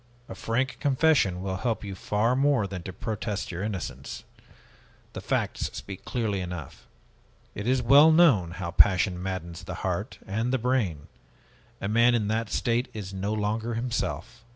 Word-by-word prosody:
A - - -7
frank 115 +7 -1
confession 135 - +2
will 95 -1 -2
help 115 -1 -2
you 100 -2 -5
far 105 +5 0
more 135 -5 +3
than 95 -2 -5
to 95 - -7
protest 105 +2 -4
your 90 +1 -5
innocence. 100 -3 -5 0.9
The - - -6
facts - - -1
speak 100 -1 -8
clearly 110 -5 -1
enough. 90 -4 -7 0.7
It 105 +3 -5
is 130 0 +2
well 145 +6 +7
known 145 - +5
how 85 -2 -4
passion 90 -1 +4
maddens 90 -3 -5
the - - -6
heart - - -2
and 110 +5 -1
the 130 - +2
brain. 115 - 0 0.8
A 100 - -2
man 115 +3 +4
in 105 -3 0
that 110 0 -1
state 120 +3 0
is 100 -3 -6
no 95 +2 -2
longer 110 +2 -1
himself." 120 0 -3
105 Hz, 160 wpm, -27 LUFS, 95-120 Hz, 0.9 s, well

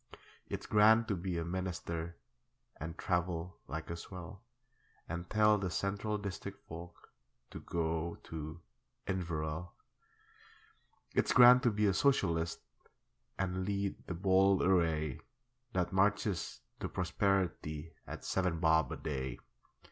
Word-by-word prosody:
It's - - -4
grand 110 +2 +5
to 100 - +2
be 90 0 -3
a 85 - -2
Minister 85 -2 -3 0.6
And 80 +2 -6
travel 90 0 -1
like 80 +4 -5
a - - -2
swell, 90 +3 -9 0.7
And 85 +2 -5
tell 105 -1 +4
the 95 -2 -1
Central 100 +3 -1
District 100 0 -5
folk 85 +2 -10 0.4
To - - -7
go 85 0 -2
to 80 +1 -6 0.4
Inverell. 85 -2 -3 1.4
It's - - +2
grand 125 0 +9
to 120 - +4
be 105 -1 +1
a 100 - +4
Socialist 85 - +2 0.8
And 95 -1 -1
lead 100 0 -1
the 90 - -3
bold 95 +1 +4
array 80 -6 +2 0.5
That 90 0 0
marches 100 -1 +1 0.2
to - - -3
prosperity 90 -4 -1
At - - -7
seven 90 -3 0
bob 80 -1 +3
a - - -3
day. 65 -4 -3
90 Hz, 125 wpm, -34 LUFS, 80-100 Hz, 1.4 s, grand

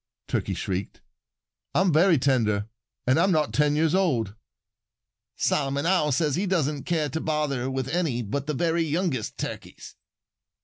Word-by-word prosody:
Turkey - - -1
shrieked. 95 0 -4 0.8
"I'm 185 -2 +3
very 170 +2 +5
tender 110 -6 +1 0.4
and 130 +5 +3
I'm 190 +3 +3
not 155 -3 +1
ten 150 0 +2
years 155 0 +2
old." 130 - +1 1.0
"Solomon 140 +1 0
Owl 170 -4 +2
says 150 0 +1
he 195 +3 -1
doesn't 150 -6 0
care 160 -4 0
to 160 +4 -3
bother 150 -5 -1
with 130 -1 -2
any 145 -6 -1
but 140 +7 -3
the 150 - -1
very 170 +3 +1
youngest 160 - -1
Turkeys." - - -7
150 Hz, 145 wpm, -26 LUFS, 130-165 Hz, 1.0 s, very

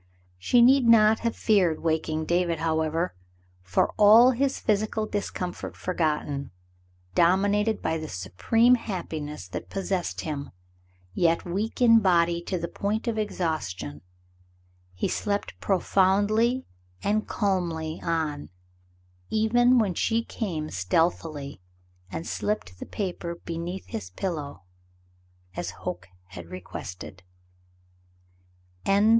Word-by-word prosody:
She 240 - +4
need 260 0 +5
not 220 -1 +6
have 230 -1 -1
feared 185 -7 +2
waking 160 -1 0
David, 170 0 +1
however, 160 +2 0 0.5
for, 90 0 +1
all 220 +4 +8
his 270 +2 0
physical 215 0 0
discomfort 200 -4 -4
forgotten, 150 -5 -1 0.6
dominated 205 +5 +2
by 160 0 0
the 155 -1 -6
supreme 160 - +2
happiness 160 - -3
that - - -6
possessed 190 -2 -2
him, 145 -3 -4 0.6
yet 165 - +2
weak 205 +7 -2
in 230 -1 +7
body 170 -3 +3
to 185 - -2
the 170 0 -3
point 210 +6 -2
of 225 -2 0
exhaustion, 95 - -3 0.9
he 90 - -1
slept 205 -1 -2
profoundly 205 +6 +2 0.4
and 215 +1 +1
calmly 170 -6 -1
on, 160 -3 -2 0.8
even 240 +3 +4
when 210 -6 +2
she 225 +6 +1
came 165 -11 -4
stealthily 140 - -1 0.5
and 165 - -5
slipped 95 - -3
the - - -7
paper 175 -4 -4
beneath 170 +3 -5
his 90 -5 -6
pillow, 145 - -5 0.9
as - - -3
Hoke 90 0 -6 0.2
had 90 -2 -9
requested. 90 +1 -8
175 Hz, 110 wpm, -26 LUFS, 155-215 Hz, 0.9 s, all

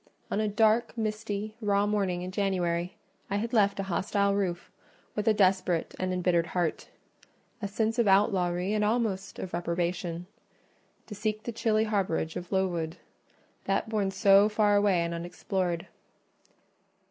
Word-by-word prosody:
On - - 0
a 215 - +1
dark, 220 +3 +2
misty, 215 -1 -3
raw 205 -1 +2
morning 195 -4 0
in 185 - -5
January, 185 -1 -1 0.3
I 200 - -1
had 225 +4 -2
left 200 -3 +3
a - - 0
hostile 200 +2 0
roof 185 -4 -2 0.4
with 210 +1 -3
a 220 - +6
desperate 185 -4 +2
and 185 0 -1
embittered 180 -2 +1
heart—a 180 +5 -6
sense 220 +3 -1
of 235 - +3
outlawry 190 -1 +2
and 210 -1 +1
almost 210 -4 -1
of 185 - -6
reprobation—to 175 0 -2 0.9
seek 215 +1 -2
the 235 - -4
chilly 220 -1 +1
harbourage 190 -6 -1
of 180 0 -6
Lowood: 175 -4 -1 0.7
that - - 0
bourne 210 -3 0
so 195 +1 +5
far 210 -1 +3
away 200 -4 +3
and 170 0 -3
unexplored. 175 +1 -2
195 Hz, 140 wpm, -28 LUFS, 180-210 Hz, 0.9 s, a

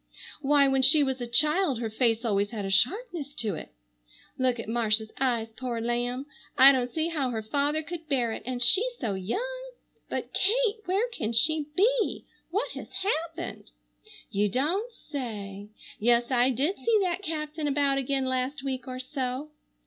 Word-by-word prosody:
Why, 285 0 +4
when 270 0 +2
she 285 +3 +7
was 265 -2 -2
a 240 - -3
child 300 +4 +3
her 225 -2 -3
face 230 0 +1
always 205 -2 +1
had 210 -3 -4
a 195 - -3
sharpness 300 - 0
to 220 -4 -1
it. 155 - -7 0.7
Look 255 -2 0
at 230 - -6
Marcia's 220 -1 0
eyes, 240 -4 0
poor 245 -3 -3
lamb! 240 +3 -2 0.3
I 270 +1 +10
don't 250 -2 0
see 320 +4 -1
how 290 -6 -1
her 220 -3 -3
father 290 +7 0
could 325 0 -8
bear 245 -5 +1
it, - - -5
and 250 -1 -1
she 360 - +6 0.2
so 210 - -1
young. - - -4 0.4
But - - -4
Kate! 455 +2 +3
Where 390 +6 +1
can 235 - -3
she 300 +5 +2
be? 460 +4 +2 0.2
What 415 +8 -1
has - - -8
happened? 335 -3 -3 0.6
You 205 0 +1
don't 340 - 0
say! 210 - -7 0.3
Yes, 240 +2 +2
I 250 0 +4
did 280 - 0
see 460 -1 +2
that 360 0 -1
captain 310 -3 -3
about 280 -1 +2
again 270 0 -1
last 260 +2 -2
week 265 -1 -4
or 255 0 -5
so. 260 +2 -4
265 Hz, 170 wpm, -27 LUFS, 240-315 Hz, 0.7 s, I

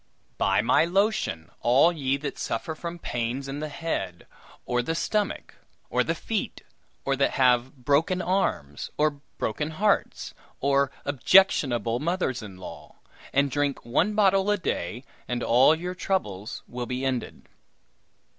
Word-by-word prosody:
"Buy 95 +2 +3
my 125 +6 +4
lotion, 180 - 0
all 130 +8 +5
ye 140 -4 0
that 140 0 -5
suffer 115 +8 -3
from 170 +2 -6
pains 125 -2 -3
in 135 +1 -5
the 155 0 -4
head, 120 - -4 0.4
or 125 0 +1
the 165 +7 -2
stomach, 210 +3 -1 0.4
or - - +3
the - - -1
feet, - - -3 0.4
or 135 - +1
that 140 +1 +1
have 125 -1 +3
broken 160 +6 +2
arms, 175 - -1
or 155 0 +3 0.3
broken 150 +8 -2
hearts, 200 +6 0 0.3
or 140 0 +2 0.2
objectionable 130 - +3
mothers 160 -6 -1
in 100 -4 -9
law; 95 - -10 0.4
and 140 0 +2
drink 145 -2 -1
one 170 - +1
bottle 195 -1 +3
a 205 - +3
day, 120 - -3 0.2
and 120 -1 -2
all 130 +6 +5
your 180 +3 -4
troubles 115 - -3
will 120 0 -5
be 130 +1 -3
ended." 130 -2 -3
140 Hz, 145 wpm, -26 LUFS, 120-170 Hz, 0.4 s, all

